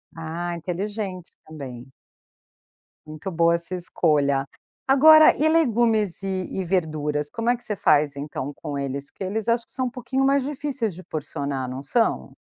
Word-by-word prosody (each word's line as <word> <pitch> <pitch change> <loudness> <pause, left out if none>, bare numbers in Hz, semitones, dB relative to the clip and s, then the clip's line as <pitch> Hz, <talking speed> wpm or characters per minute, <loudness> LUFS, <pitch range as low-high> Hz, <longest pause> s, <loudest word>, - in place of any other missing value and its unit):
Ah, 165 +2 -4
inteligente 185 +1 -5
também. 135 -5 -9 1.1
Muito 155 +5 -7
boa 170 0 +3
essa 170 +2 -5
escolha, 145 -6 +1 0.4
agora 310 +3 +8
e 310 +2 +2
legumes 230 - +2
e 190 -2 -3
e 190 - -1
verduras 155 -4 -1
como 230 +1 -1
é 245 - +3
que - - -14
você 210 - -3
faz, 150 -5 +3
então 140 -1 -5
com 145 -2 -6
eles, 140 0 -4
que - - -8
eles 210 +3 -3
acho 230 0 +1
que - - -18
são 255 -1 -1
um - - -3
pouquinho 255 +2 -2
mais 275 0 +3
difíceis 275 - -2
de 185 +2 -11
porcionar, 140 -3 -4
não 130 +2 -5
são? 225 - 0
180 Hz, 165 wpm, -24 LUFS, 150-230 Hz, 1.1 s, agora